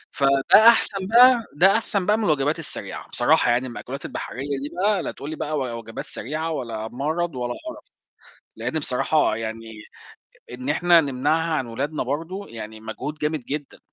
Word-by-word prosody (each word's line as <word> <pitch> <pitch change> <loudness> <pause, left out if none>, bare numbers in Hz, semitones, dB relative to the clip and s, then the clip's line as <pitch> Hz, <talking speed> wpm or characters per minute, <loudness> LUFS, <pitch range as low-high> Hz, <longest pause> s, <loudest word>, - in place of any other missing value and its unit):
فده 140 +10 +5
أحسن 195 -4 +4
بقى 240 +1 +6
ده 190 +8 +4
أحسن 200 -4 0
بقى 210 +2 +3
من 225 - -2
الوجبات 150 -1 +1
السريعة، 165 - -2
بصراحة 120 - +3
يعني 125 +2 0
المأكولات 130 +3 -7
البحرية 140 +2 -5
دي 145 - -5
بقى 200 -3 +2
لا - - -3
تقول 140 - -9
لي 155 - -5
بقى 155 0 -3
و 125 -4 -3
وجبات 115 0 -8
سريعة 155 +7 -3
ولا 115 -6 -4
مَرَض 155 +5 -3
ولا 120 -1 -3
قَرَف، 320 0 -9 0.7
لإن 160 - -2
بصراحة 145 -2 +2
يعني 115 0 -6 0.8
إن 125 +2 -7
إحنا 170 +3 +4
نمنعها 160 +4 0
عن 135 -5 -1
ولادنا 140 +6 -3
برضه 165 +9 -4
يعني 110 -1 -9
مجهود 120 +7 -6
جامد 150 -1 -1
جدًا. 145 0 -6
145 Hz, 170 wpm, -23 LUFS, 125-170 Hz, 0.8 s, بقى